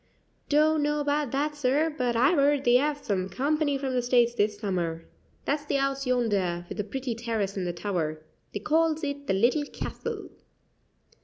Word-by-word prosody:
"Don't 305 +1 +4
know 295 0 +1
about 290 -1 0
that, 295 +2 0
sir; 290 +3 +1
but 245 -4 0
I've 270 +7 +4
'eard 285 0 +3
they 245 0 +5
'ave 290 +1 -1
some 190 -3 -1
company 290 +3 0
from 270 -1 -3
the 250 - +2
States 240 -1 +3
this 210 -2 0
summer. 175 -5 -2 0.4
That's 290 +1 0
the 290 - -1
house 275 -1 0
yonder, 200 -9 0
with - - -7
the - - +1
pretty 255 +4 -4
terrace 225 -4 -2
and 185 -2 -2
the - - 0
tower. 170 -4 -2 0.3
They 205 - -5
calls 320 +3 +1
it 285 -1 -4
the 195 - +2
Little 240 +9 +3
Castle." - - -6
255 Hz, 180 wpm, -27 LUFS, 205-290 Hz, 0.4 s, they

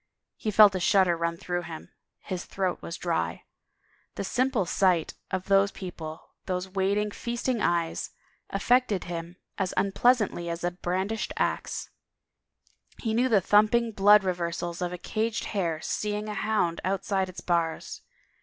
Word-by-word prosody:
He 215 - -3
felt 210 -1 +7
a 185 - -1
shudder 180 -1 +4
run 170 0 -2
through 175 +1 -2
him; 165 -2 -9 0.3
his 185 -2 -5
throat 190 -2 -2
was 170 - -6
dry. 85 - -2 0.7
The - - -3
simple 245 0 +1
sight 180 -2 +2 0.2
of 190 -1 -2
those 195 0 +4
people, 165 -4 -8 0.2
those 185 0 -2
waiting, 200 +2 0
feasting 235 +1 -2
eyes, 170 -3 0 0.4
affected 215 -1 +2
him 170 0 -6 0.2
as 190 -2 -1
unpleasantly 200 -2 +2
as 170 0 -4
a 175 - +1
brandished 190 +5 -2
ax. - - -2 1.1
He 225 -2 -2
knew 245 +3 +2
the 210 -5 +4
thum 210 +4 +5
ping 235 +1 +1
blood 205 0 +6
reversals 175 -1 -2
of 175 -1 -1
a 180 - -5
caged 220 +5 -2
hare 170 -6 -1
seeing 210 0 -2
a 210 - -3
hound 205 -7 0
out 195 +1 -1
side 190 -2 0
its 185 - -8
bars. 170 -2 -1
190 Hz, 155 wpm, -27 LUFS, 175-210 Hz, 1.1 s, felt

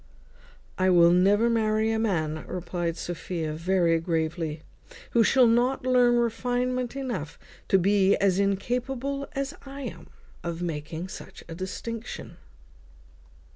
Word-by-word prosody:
"I 185 0 +3
will 170 -1 +6
never 200 +6 +4
marry 220 -1 +2
a 220 - 0
man," 160 -8 -1
replied 175 -1 -3
Sophia, 170 -2 -4
very 170 0 +2
gravely, 160 -1 -2 0.5
"who 235 - +4
shall 255 +3 +5
not 250 +3 +2
learn 250 -1 +4
refinement 245 +2 0
enough 235 - -4 0.3
to 195 - +4
be 195 +1 +4
as 195 -1 +2
incapable 250 +7 -1
as 275 +1 -3
I 275 0 -8
am - - -5
myself 235 - -9 0.3
of 170 0 -4
making 160 +1 -4
such - - -10
a 165 - -7
distinction." 220 +6 -6
200 Hz, 130 wpm, -26 LUFS, 170-245 Hz, 0.5 s, will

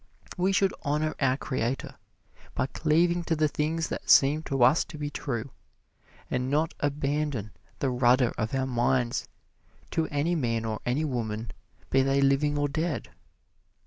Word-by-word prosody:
We 185 +1 +1
should 195 0 +2
honor 150 +1 0
our 135 -2 +2
Creator 130 -2 -2 0.6
by - - +1
cleaving 170 +5 +1
to 165 - +1
the 155 0 +2
things 155 +3 -1
that - - -5
seem 145 +3 +6
to 135 -3 +1
us 130 +7 +5
to 170 -3 -10
be 145 0 -4
true, 120 -2 -4 0.8
and 125 +1 -1
not 155 +3 +1
abandon 145 -6 -1 0.3
the 135 - 0
rudder 125 0 +3
of 110 +4 -2
our 130 0 0
minds 125 -1 0 0.6
to 160 - 0
any 150 +4 0
man 115 -8 0
or 110 -1 -2
any 140 +6 +1
woman, 115 -5 -3 0.4
be 135 - +4
they 135 +1 +2
living 140 +2 +2
or 145 0 +1
dead. 155 +2 -3
140 Hz, 155 wpm, -27 LUFS, 125-155 Hz, 0.8 s, seem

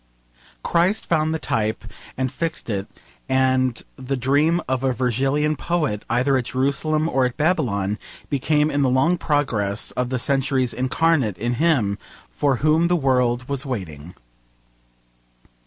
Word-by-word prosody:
Christ 180 +6 +1
found 155 -2 +1
the 160 - 0
type 110 -7 -2 0.3
and 130 -1 -1
fixed 165 -7 -4
it, 100 -1 -3 0.4
and 130 -2 +2 0.2
the 130 0 -3
dream 145 +7 +2
of 130 0 -1
a 130 -1 +2
Virgilian 135 +5 0
poet, 150 -11 -1
either 130 +3 +2
at 125 - -2
Jerusalem 140 +5 0
or 135 -5 +1
at 125 - -9
Babylon, 115 - 0 0.3
became 150 +2 +1
in 145 0 0
the 135 - +3
long 135 +8 +3
progress 115 -10 0
of 125 -1 -2
the 130 - -1
centuries 135 -1 0
incarnate 130 - +1
in 120 +5 -1
him 120 -12 +2 0.3
for 140 -2 +1
whom 155 +6 +2
the 175 - +2
world 125 -4 +1
was 140 -1 -2
waiting. 90 - -6
130 Hz, 140 wpm, -22 LUFS, 120-155 Hz, 0.4 s, the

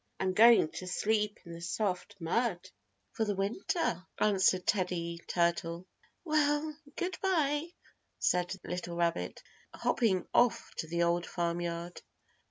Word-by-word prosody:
I'm 190 -1 0
going 225 -4 +7
to 185 - -7
sleep 210 +2 0
in 170 - -9
the 165 - -9
soft 185 +2 -2
mud 185 +1 0 0.4
for 225 - -1
the 205 -2 -1
winter," 200 - -1
answered 190 -3 +3
Teddy 170 -4 -1
Turtle. 170 0 0 0.4
"Well, 305 -1 +1 0.2
goodby," 340 -4 0 0.4
said 180 -1 +1
the 195 - -7
little 175 -1 -4
rabbit, 170 0 -1 0.3
hopping 195 -7 +1
off 245 -1 +3
to 160 - -3
the 170 +1 0
Old 170 0 +1
Farm 170 0 -1
Yard. 170 0 -4
185 Hz, 130 wpm, -31 LUFS, 170-230 Hz, 0.4 s, going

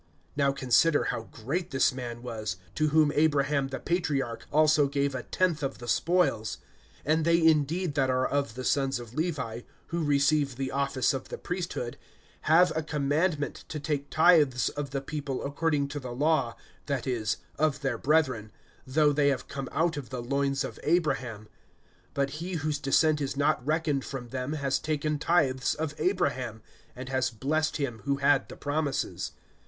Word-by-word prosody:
(4)Now 140 -1 +2
consider 140 +4 +3
how 115 - -3
great 145 +11 -3
this 135 -1 +2
man 120 -2 -6
was, 110 -6 -4 0.2
to 155 - +1
whom 155 -1 +4
Abraham 145 -2 +2
the 135 0 -5
patriarch 140 -9 -1
also 150 -1 +4
gave 140 0 0
a 130 - -3
tenth 175 +2 0
of 135 - -3
the 120 - -9
spoils. 165 -8 +1 0.5
(5)And 155 +3 +2
they 170 +1 +4
indeed 160 +2 +2
that 135 -3 +1
are 130 0 +2
of 140 -5 -1
the 130 - -5
sons 135 -1 +1
of 120 -1 -10
Levi, 130 -8 -2 0.3
who 170 0 -1
receive 145 -1 +2
the 135 +1 -3
office 140 -2 +1
of 130 -1 -5
the - - -5
priesthood, 175 -9 -4 0.5
have 170 +2 +6
a 160 - +1
commandment 150 +1 -1
to 155 - -5
take 145 -1 -2
tithes 155 -6 +4
of 145 -1 -5
the 135 0 -3
people 140 -2 -4
according 145 0 0
to 145 - -4
the 125 -3 -6
law, 135 -4 +1 0.3
that 140 -4 -1
is, 115 -5 -1 0.2
of 150 -2 +1
their 130 -4 -1
brethren, 130 -8 +1 0.4
though 145 +2 +3
they 145 0 +3
have 135 -3 0
come 135 -2 -5
out 165 -1 +1
of 135 -6 -6
the 125 -1 -5
loins 140 +2 0
of - - -6
Abraham; 130 -10 0 0.7
(6)but 140 0 +1
he 185 +2 -4
whose 155 -3 -1
descent 150 +2 +3
is 135 -1 -2
not 145 -2 +2
reckoned 150 -1 0
from 125 -3 -6
them 130 +3 -3
has 140 -3 0
taken 150 -1 -1
tithes 135 -5 +2
of 155 -1 -3
Abraham, 135 - -1 0.3
and 130 +1 -7
has 130 -2 +1
blessed 145 +7 -1
him 125 -7 -3
who 140 0 +2
had 140 0 +2
the - - -8
promises. 145 -1 -2
140 Hz, 175 wpm, -28 LUFS, 130-155 Hz, 0.7 s, have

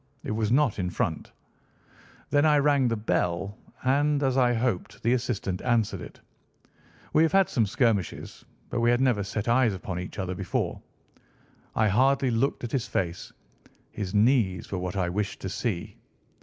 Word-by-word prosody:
It - - -4
was 110 0 0
not 130 -5 +2
in 90 -1 -1
front. 80 -2 -3 1.0
Then 145 0 +4
I 150 -1 +5
rang 140 -2 +3
the 115 - 0
bell, 100 -2 -1 0.3
and, 145 +2 +2
as 130 -2 +1
I 125 -2 +4
hoped, 120 -5 -2
the 120 - +3
assistant 105 -7 -2
answered 120 -4 0
it. - - -11 0.9
We 155 - +5
have 160 - +3
had 195 -1 +5
some 115 -5 +1
skirmishes, 110 -3 -1 0.3
but - - -1
we 115 0 +3
had 120 0 +3
never 125 -6 +2
set 105 +2 -4
eyes 120 -3 +3
upon 90 -1 -5
each 90 - -7
other 95 -2 -2
before. 90 -1 -2 0.9
I 110 - +3
hardly 130 +5 +3
looked 120 +5 0
at 120 - -4
his 130 -3 -1
face. 85 -2 -3 0.6
His 100 -4 -4
knees 105 -5 +2
were 95 - -2
what 90 +1 -4
I 90 -2 +1
wished 100 +3 -3
to 95 - -4
see. 95 -2 -3
115 Hz, 170 wpm, -27 LUFS, 95-130 Hz, 1.0 s, I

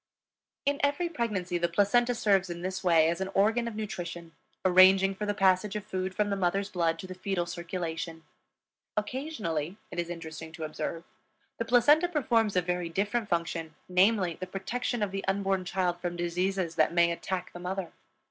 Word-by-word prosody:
In 285 0 +1
every 290 +5 +1
pregnancy 205 - -2
the 175 0 +1
placenta 235 +7 +3
serves 195 -5 +2
in 170 0 -6
this 185 +1 -3
way 165 -3 +5
as 170 +3 -1
an 190 - -1
organ 225 +4 +3
of 230 - -5
nutrition, 175 -5 -5 0.3
arranging 190 +1 +6
for 210 +2 -4
the 205 - 0
passage 195 +1 +3
of 210 - -4
food 185 0 -3
from 205 -1 +1
the - - +1
mother's 195 +1 0
blood 165 -2 +1
to 175 - -8
the 185 - -7
fetal 185 -1 -2
circulation. 165 -1 -5 0.7
Occasionally, 210 - -3
it 175 - -4
is 170 0 -2
interesting 160 -1 -7
to 165 -1 -7
observe, 155 +2 -4 0.6
the 230 - -1
placenta 290 +9 +5
performs 235 - +1
a 180 - +3
very 180 -1 -2
different 210 +5 -1
function, 165 -2 -2
namely, 185 -1 +3
the 185 - -4
protection 215 +5 -2
of 200 - -1
the 195 0 -3
unborn 195 -1 0
child 180 -1 -1
from 175 -1 -3
diseases 175 +1 -1
that 155 +2 +3
may 170 0 +5
attack 180 +1 -4
the 175 - -8
mother. 180 0 -4
185 Hz, 180 wpm, -29 LUFS, 175-210 Hz, 0.7 s, arranging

